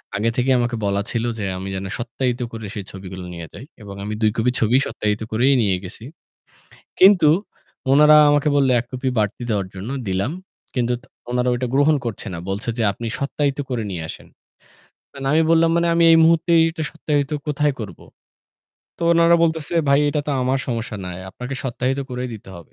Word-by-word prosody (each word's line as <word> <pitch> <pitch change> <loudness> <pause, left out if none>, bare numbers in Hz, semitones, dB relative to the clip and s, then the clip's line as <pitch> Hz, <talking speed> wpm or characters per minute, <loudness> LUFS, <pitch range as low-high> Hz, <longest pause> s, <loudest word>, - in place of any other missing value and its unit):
আগে 105 +3 +1
থেকেই 130 +1 +2
আমাকে 120 0 -1
বলা 100 0 0
ছিল 115 -1 -1 0.2
যে 100 - -2
আমি 95 +1 -5
যেন 95 +1 -4
সত্যায়িত 125 +1 -2
করে 110 -1 -7
সেই 100 -3 -5
ছবিগুলো 95 -1 -8
নিয়ে 85 -1 -7
যাই। 130 - -10 0.2
এবং 100 -2 -9
আমি 105 +1 -4
২ 110 -1 +3
কপি 120 +2 +2
ছবি 115 +3 +3
সত্যায়িত 105 0 -2
করেই 125 +5 +3
নিয়ে 100 -4 +2
গেছি। 95 +4 -9 1.0
কিন্তু 185 -5 +7 0.6
উনারা 150 +2 +7
আমাকে 145 +1 +2
বলল 140 -2 +3
১ 120 - -9
কপি 130 +1 -2
বাড়তি 105 +3 -1
দেওয়ার 100 -3 0
জন্য 95 +6 -6 0.2
দিলাম। 95 +9 -1 0.4
কিন্তু 125 -1 0
ত - - -20 0.3
ওনারা 125 0 0
ওইটা 125 +1 -2
গ্রহণ 145 +2 +4
করছে 115 -1 -4
না। - - -5
বলছে 100 +4 -4
যে, - - +1
"আপনি 115 +4 -7
সত্যায়িত 140 0 -1
করে 120 -3 -1
নিয়ে 85 -3 -4
আসেন।" - - -9 1.0
না - - 0
আমি 160 - +4
বললাম, 165 0 +4
"মানে 170 - +2
আমি 170 - +4
এই - - +7
মুহূর্তে 165 +1 +3 0.2
এটা 160 -1 -5
সত্যায়িত 145 -3 -1 0.2
কোথায় 150 0 +1
করব?" 105 -3 -7 1.0
তো - - -6
ওনারা 170 0 +5
বলতেছে, 160 0 0
"ভাই 140 +1 +5
এটা 145 +1 0
তো - - -1
আমার 130 +2 +1
সমস্যা 115 -2 -3
নাই। 90 0 -6
আপনাকে 125 +6 -6
সত্যায়িত 130 +2 -1
করেই 125 0 -4
দিতে 105 - -12
হবে।" 85 - -14
125 Hz, 190 wpm, -21 LUFS, 105-145 Hz, 1.0 s, কিন্তু